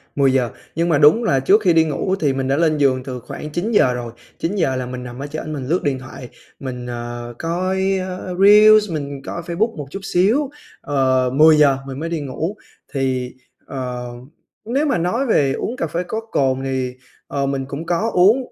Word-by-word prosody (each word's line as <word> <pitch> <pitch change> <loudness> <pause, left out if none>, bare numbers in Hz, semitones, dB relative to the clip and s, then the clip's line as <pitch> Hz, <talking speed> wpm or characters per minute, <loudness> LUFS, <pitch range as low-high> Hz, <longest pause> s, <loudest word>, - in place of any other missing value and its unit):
10:00 130 -4 +2 0.3
nhưng 170 +2 0
mà 155 - +3
đúng 150 +11 +5
là 135 -11 +2
trước 200 +11 +4
khi 180 -5 +3
đi 160 -1 +5
ngủ 185 +5 -1
thì 145 -5 +1
mình 135 0 -2
đã 135 +1 +1
lên 155 -2 +2
giường 130 -3 +2
từ 130 -2 -6
khoảng 150 +5 -8
9:00 175 - +2
rồi, 120 -1 -5 0.3
9:00 165 -7 0
là 130 -1 -3
mình 125 0 -6
nằm 120 +1 -8
ở 140 - -5
trển 155 +1 -5
mình 130 -3 -5
lướt 175 +4 0
điện 135 -3 0
thoại, 130 -1 -10 0.3
mình, 125 -2 -6
ờ, 120 0 -6
coi, 185 +3 0
ơ, 185 0 -5
reels, 210 0 +7
mình 140 -3 -4
coi 170 - -5
Facebook 180 +7 -1
một 145 -2 -6
chút 195 - -5
xíu. 225 +11 +3 0.3
Ờ, 130 -2 +1
10:00 150 -2 +6
mình 135 +1 -6
mới 165 +1 -3
đi 170 - -2
ngủ 160 +8 -4 0.4
thì, 130 -2 -1 0.3
ờ, 125 -2 -5 0.6
nếu 270 +7 0
mà 280 - +1
nói 180 +11 0
về 140 - +2
uống 235 - -3
cà 165 - -1
phê 170 +4 -2
có 220 +3 -3
cồn, 130 -1 +1
thì, 130 -2 -2 0.3
ờ, 140 -1 -2
mình 135 -1 -2
cũng 140 +4 -6
có 180 +7 0
uống 195 +7 +5
145 Hz, 200 wpm, -20 LUFS, 130-180 Hz, 0.6 s, reels